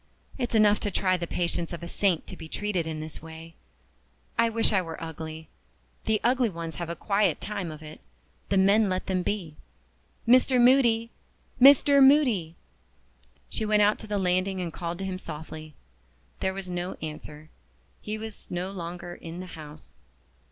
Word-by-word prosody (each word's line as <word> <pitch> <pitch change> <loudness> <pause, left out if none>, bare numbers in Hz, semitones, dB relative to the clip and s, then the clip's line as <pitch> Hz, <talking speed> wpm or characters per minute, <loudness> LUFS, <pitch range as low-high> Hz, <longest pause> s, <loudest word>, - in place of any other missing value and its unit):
It's 240 -2 -1
enough 210 -1 +5
to 205 - -2
try 185 -1 +1
the 170 -1 -3
patience 170 0 -2
of 170 - -6
a - - -5
saint 180 -2 +1
to - - -8
be 160 - -9
treated 190 -5 -2
in 155 -1 -4
this 155 0 -8
way. 160 +1 -10 0.8
I 230 0 +3
wish 225 -1 +1
I 190 - +3
was 165 -2 -7
ugly! 160 -1 -7 0.6
The 220 -1 +2
ugly 250 0 +3
ones 165 -3 -6
have 170 -1 -4
a 170 - -3
quiet 200 +3 +1
time 200 -4 -4
of 155 0 -9
it 155 0 -11 0.5
the 195 - +2
men 200 +2 +4
let 185 0 -2
them 185 -1 0
be. 175 -6 -3 0.7
Mr. 255 +1 +5
Moody! 240 -2 +4 0.5
Mr. 280 +1 +7
Moody!" 250 - +4 0.9
She - - -4
went 210 -1 +3
out 210 +1 +3
to 220 - -8
the 205 -1 -1
landing 185 0 +1
and 175 -2 -4
called 170 0 -4
to 195 - -4
him 185 -1 -4
softly. 155 -1 -8 0.6
There 190 0 -1
was 195 -1 -6
no 180 +1 -3
answer. 150 0 -8 0.5
He 215 +1 -4
was 220 -1 -9
no 180 +2 -3
longer 175 -1 -6
in 170 0 -8
the 185 - -6
house. 150 -1 -11
185 Hz, 175 wpm, -27 LUFS, 165-215 Hz, 0.9 s, Mr